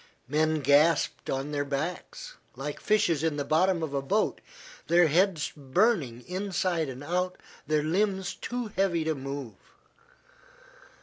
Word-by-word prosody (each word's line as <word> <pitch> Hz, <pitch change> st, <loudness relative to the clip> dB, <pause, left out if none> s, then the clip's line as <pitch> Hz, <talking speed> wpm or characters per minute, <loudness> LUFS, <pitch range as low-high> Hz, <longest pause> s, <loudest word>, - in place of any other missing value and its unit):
Men 155 Hz, +2 st, +1 dB
gasped 145 Hz, +5 st, +3 dB
on 135 Hz, +2 st, -2 dB
their 145 Hz, -1 st, 0 dB
backs, 145 Hz, +5 st, -4 dB, 0.2 s
like 140 Hz, +3 st, -5 dB
fishes 175 Hz, -8 st, +2 dB
in 160 Hz, -2 st, +1 dB
the 145 Hz, -, -2 dB
bottom 170 Hz, +3 st, +2 dB
of 150 Hz, -3 st, -3 dB
a 140 Hz, -, 0 dB
boat, 135 Hz, -, 0 dB, 0.5 s
their 175 Hz, +2 st, +5 dB
heads 175 Hz, 0 st, +2 dB
burning 140 Hz, -, +1 dB
inside 180 Hz, -4 st, -1 dB
and 130 Hz, +2 st, -7 dB
out, 180 Hz, +4 st, -1 dB, 0.3 s
their 155 Hz, -1 st, +2 dB
limbs 190 Hz, +3 st, 0 dB
too 245 Hz, -2 st, -4 dB
heavy 180 Hz, -4 st, +1 dB
to 160 Hz, 0 st, 0 dB
move. 135 Hz, -3 st, -6 dB
160 Hz, 135 wpm, -28 LUFS, 145-180 Hz, 0.5 s, their